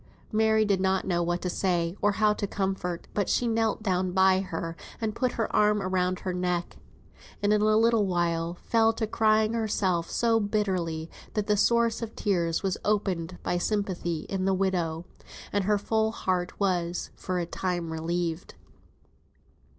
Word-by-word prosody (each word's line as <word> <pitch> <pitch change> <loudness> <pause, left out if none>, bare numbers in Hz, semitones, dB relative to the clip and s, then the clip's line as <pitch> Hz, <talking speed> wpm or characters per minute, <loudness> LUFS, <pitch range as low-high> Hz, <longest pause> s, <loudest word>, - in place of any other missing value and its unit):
Mary 220 0 +3
did 200 -2 +1
not 190 0 +1
know 175 -2 +1
what 175 +1 -1
to - - -1
say, 175 -1 0
or 205 0 +3
how 210 0 +3
to 205 - -3
comfort; 190 -3 -3
but 205 -2 0
she 245 - +1
knelt 225 -1 0
down 185 -2 0
by 190 0 +5
her, 165 -3 -4 0.2
and 220 -2 -2
put 255 0 0
her 225 - -2
arm 210 0 +4
round 185 -1 0
her 185 - -2
neck, 180 -1 -2 0.7
and 205 +1 +4
in 210 - +3
a 215 0 +4
little 225 -2 +3
while 170 -1 0
fell 225 -1 +3
to 225 0 -2
crying 215 0 +2
herself 195 -6 0
so 230 -1 +2
bitterly, 185 -7 -1 0.3
that 210 -2 0
the 210 -1 +2
source 235 +2 +2
of 225 -1 -6
tears 170 -5 0
was 190 -1 -1
opened 185 -5 -1
by 175 - 0
sympathy 180 -5 -1
in 190 +2 -3
the 190 0 +2
widow, 175 -4 -1 0.5
and 200 -2 +1
her 210 +1 +3
full 220 +2 0
heart 185 -5 -2
was, 175 -3 -1
for 185 -1 -3
a 175 - -1
time, 175 -2 -3
relieved. 170 +1 -3
190 Hz, 170 wpm, -27 LUFS, 175-215 Hz, 0.7 s, by